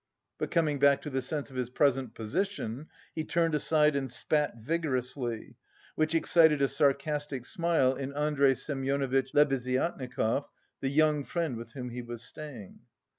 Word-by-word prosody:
But - - -2
coming 155 -4 +1
back 140 0 +4
to 150 - -5
the 130 0 0
sense 145 +2 -3
of - - -12
his 125 -2 -2
present 135 -2 +1
position, 135 - -3 0.3
he 160 - -2
turned 165 0 +1
aside 150 0 +3
and 135 -1 -1
spat 150 +2 0
vigorously, 125 -4 -3 0.4
which 155 +1 0
excited 160 -2 +5
a 140 - +3
sarcastic 145 -2 0
smile 165 -6 +2
in 135 +1 -4
Andrey 145 -2 +3
Semyonovitch 135 -1 -1
Lebeziatnikov, 130 -2 +1 0.3
the 135 - -1
young 150 0 +3
friend 165 -4 -2
with 115 +1 -9
whom 125 -3 -6
he 125 +1 -5
was 120 -1 -8
staying. 130 -11 -9
140 Hz, 150 wpm, -30 LUFS, 130-150 Hz, 0.4 s, excited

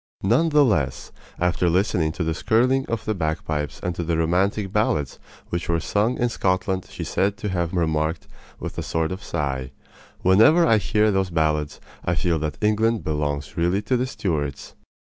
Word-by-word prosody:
None 120 +12 +3
the 150 -2 +5
less, 75 - -1 0.3
after 90 0 +1
listening 85 -3 +1
to 85 - -3
the 80 0 0
skirling 130 +9 +2
of 115 -1 -3
the 110 - 0
bagpipes 80 -4 -3
and 90 - -1
to 85 - -4
the 85 0 0
romantic 95 +4 0
ballads 80 - 0 0.3
which 85 0 -3
were 85 -1 +2
sung 105 +8 0
in 120 - +1
Scotland 95 -3 -1
she - - -6
is - - -6
said 100 +1 0
to 105 +1 -3
have 85 -3 -1
remarked 80 -2 -1 0.3
with - - -6
a - - -1
sort 80 0 -1
of 95 +2 -5
sigh: 65 -2 -3 0.5
"Whenever 115 - +6
I 115 -2 +4
hear 105 +1 +2
those 95 -1 0
ballads 75 -3 0 0.2
I 85 - 0
feel 85 -1 0
that 75 0 -3
England 110 +1 +2
belongs 75 -1 -2
really 90 +4 +1
to 125 - +1
the 125 +1 0
Stuarts!" 75 - -3
90 Hz, 185 wpm, -23 LUFS, 80-105 Hz, 0.5 s, Whenever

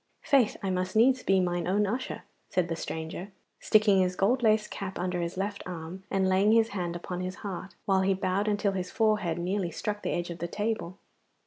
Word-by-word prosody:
'Faith! 270 -8 +3
I 190 - 0
must 185 +1 -2
needs 255 +3 +5
be 195 0 +3
mine 175 -2 0
own 205 +3 +2
usher,' 245 +6 -3 0.3
said 180 -2 0
the 165 - -1
stranger, 160 +4 -5 0.3
sticking 210 -3 +4
his 185 0 0
gold 235 +8 +2
laced 215 -2 +3
cap 190 -1 -5
under 180 0 -1
his 170 +1 -4
left 200 +1 -2
arm 180 +2 -7
and 195 -1 +1
laying 195 +3 +4
his 225 0 +4
hand 175 -5 -3
upon 180 +1 -5
his 185 0 -4
heart, 190 -2 -5
while 190 -1 +3
he 190 0 +2
bowed 190 +2 0
until 205 -1 +1
his 185 -2 -3
forehead 210 -7 +1
nearly 180 +1 -1
struck 210 +5 -4
the - - -2
edge 175 0 -2
of 170 - -7
the 170 - -2
table. 205 -2 -3
190 Hz, 210 wpm, -29 LUFS, 180-210 Hz, 0.3 s, needs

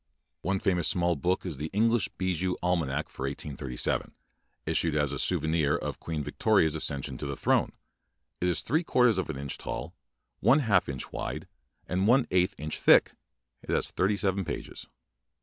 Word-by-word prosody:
One 95 +3 0
famous 90 -5 +1
small 85 0 +2
book 90 +7 -1
is 85 -7 -4
"The 75 +3 -4
Eng 115 +2 +4
lish 115 -3 +1
Bijou 95 -1 -1
Almanack 80 -5 0
for 65 - -5
1837", 70 -3 -3 0.5
issued 80 -3 +1
as 75 -2 +1
a - - -3
souvenir 80 -3 +2
of - - -4
Queen 80 -3 -4
Victoria's 80 +2 +2
ac 80 - +1
cession 65 -3 -4
to 75 - -4
the 70 - -3
throne. - - +1 0.7
It 90 - 0
is 90 - +2
three 160 +4 0
quarters 125 - +3
of 95 - -3
an 75 - -4
inch 70 0 -5
tall, - - -5 0.5
one 135 - +5
half 100 - +2
inch 65 -3 -5
wide, - - -5 0.4
and 95 +3 0
one 125 +2 +5
eighth 90 +1 +2
inch 75 +1 -4
thick. - - +6 0.5
It - - -16
has - - +1
thirty 100 +3 +1
seven 95 -1 0
pages. - - -6
85 Hz, 180 wpm, -28 LUFS, 75-95 Hz, 0.7 s, thick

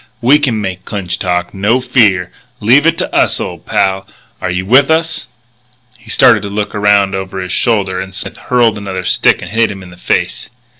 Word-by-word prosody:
We 135 +6 +4
can 125 -7 0
make 95 -3 -5
Clinch 95 -3 -5
talk, 90 -1 -2
no 105 +6 +1
fear! 110 -8 +2 0.3
Leave 130 +9 +4
it 165 0 +2
to - - -3
us, - - +2
old - - -7
pal. 95 0 0 0.3
Are 90 - -2
you 90 +1 -2
with 130 +7 +4
us?" 160 0 0 0.7
He 115 -2 -19
started - - +5
to 100 - -6
look 105 0 -3
around 105 -1 +2
over 95 0 -5
his 90 -1 -5
shoulder 100 -6 0
and 95 0 -7
Smith 95 - -5
hurled 115 -4 +1
another 95 -2 -5
stick - - +2
and 90 - -8
hit 115 +1 +2
him 95 -1 -8
in 90 - -13
the 90 - -15
face. - - -2
100 Hz, 200 wpm, -13 LUFS, 95-115 Hz, 0.7 s, started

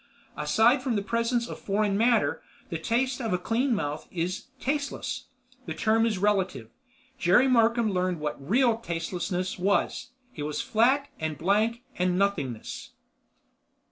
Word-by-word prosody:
Aside 235 +4 +3
from 250 -2 -1
the 200 - 0
presence 230 +2 0
of - - -7
foreign 205 0 0
matter, 235 +3 +2 0.3
the - - -3
taste 255 +3 0
of 225 -5 -1
a - - +3
clean 235 +7 0
mouth 150 -5 -3
is—tasteless. 260 - -3 0.4
The 160 - -4
term 220 +7 +2
is 215 -4 -1
relative. 185 - 0 0.5
Jerry 215 +8 +5
Markham 230 -2 +3
learned 180 -2 0
what 150 -1 -5
real 240 0 +4
tastelessness 180 0 -3
was. 200 +5 0 0.3
It 150 - -6
was 150 0 -3
flat 260 +6 +2
and 160 -2 -3
blank 215 - +1 0.2
and—nothingness. 180 - -1
210 Hz, 135 wpm, -27 LUFS, 180-235 Hz, 0.5 s, Jerry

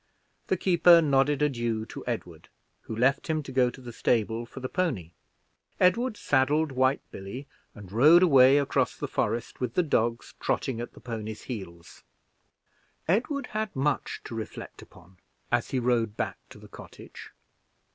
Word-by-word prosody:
The 190 - +1
keeper 175 -1 +6
nodded 145 -1 +2
adieu 120 -6 -1
to - - -9
Edward, - - -5 0.3
who 110 - -7
left 130 +5 +1
him 155 -2 -1
to 140 - -9
go 125 -1 +3
to 125 - -12
the 120 -2 -9
stable 115 0 0
for - - -10
the 130 - -4
pony. 130 - -2 0.7
Edward 215 +5 +2
saddled 145 +3 +1
White 130 +1 +1
Billy, 100 +9 -8 0.3
and 100 -4 -12
rode 155 - +6
away 135 -4 +6
across 135 -2 0
the 145 - -4
forest 115 -3 -2
with 125 -2 -3
the 180 - +3
dogs 120 -6 -1
trotting 120 -3 -1
at 120 - -7
the - - -15
pony's 110 -3 -6
heels. 85 -8 -9 1.1
Edward 250 - 0
had 215 -1 -3
much 140 +1 -1
to - - -8
reflect 110 -1 -7
upon 90 +2 -18 0.3
as 120 -1 +1
he 135 - -1
rode 120 -3 0
back - - -3
to - - -13
the - - -14
cottage. - - -12
130 Hz, 160 wpm, -27 LUFS, 115-150 Hz, 1.1 s, keeper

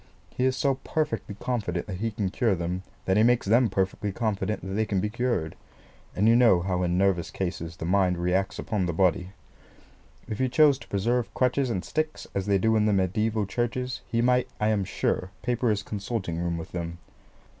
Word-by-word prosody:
He 125 - -1
is 130 0 +2
so 135 0 +1
perfectly 115 -10 -2
confident 100 -9 -2
that 95 -3 -5
he 115 +2 0
can 105 -4 -2
cure 110 -1 +1
them, 90 +2 -3 0.2
that 95 +1 +2
he - - +5
makes 120 +1 +3
them 115 +3 +4
perfectly 95 +1 -1
confident 105 -1 -2
that 95 - -5
they 110 +2 +1
can 100 -3 -1
be 105 +3 -1
cured; 120 -10 -1 0.6
and 105 +4 +2
you 115 - +6
know 115 -8 +5
how 90 0 -1
in 90 0 +1
nervous 95 -3 +2
cases 85 -3 -4
the - - -5
mind 90 0 +2
reacts 90 +3 0
upon 100 -5 -1
the 85 - -1
body. 90 +1 +2 1.0
If 110 -2 -5
he 130 0 +2
chose 145 0 +5
to - - -13
preserve 115 +5 0
crutches 130 +1 +1
and 95 -5 -2
sticks, 155 0 -2
as 100 0 -2
they 100 -1 +4
do 110 +3 +2
in 110 -1 +3
the 105 - +3
mediaeval 105 +3 +1
churches, 120 +5 -2
he 115 0 0
might, 125 0 +3
I 105 - +2
am 105 -3 +1
sure, 90 - -1
paper 120 -1 +1
his 105 -1 0
consulting 100 -5 -3
room 85 -1 -1
with 80 - -7
them. 85 -1 -4
105 Hz, 205 wpm, -27 LUFS, 95-120 Hz, 1.0 s, you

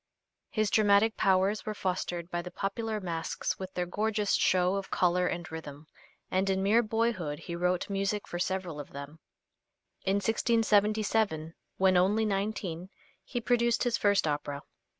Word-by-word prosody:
His 215 -2 0
dramatic 215 +1 +4
powers 195 +2 +2
were 215 - -4
fostered 180 -2 -3
by 175 - -1
the 180 - -7
popular 215 +3 -3
masques 165 -4 -3
with 190 0 -6
their 180 - 0
gorgeous 210 +2 0
show 180 0 +3
of 195 -1 -3
color 180 0 +2
and 175 0 -3
rhythm, 150 -2 -8 0.5
and 190 +1 +1
in 190 0 +1
mere 215 +4 +4
boyhood 215 -9 -1
he 170 - -6
wrote 180 +1 0
music 200 +1 -1
for 175 - -5
several 180 -4 -2
of 145 - -9
them. 140 +3 -8 0.8
In 195 0 +1
1677, 215 -5 +1 0.2
when 190 -1 +4
only 205 +5 +3
nineteen, 195 -4 -2 0.3
he 245 - -3
produced 235 0 +2
his 245 -2 +1
first 200 -3 +3
opera. 145 -1 -3
190 Hz, 150 wpm, -30 LUFS, 175-215 Hz, 0.8 s, dramatic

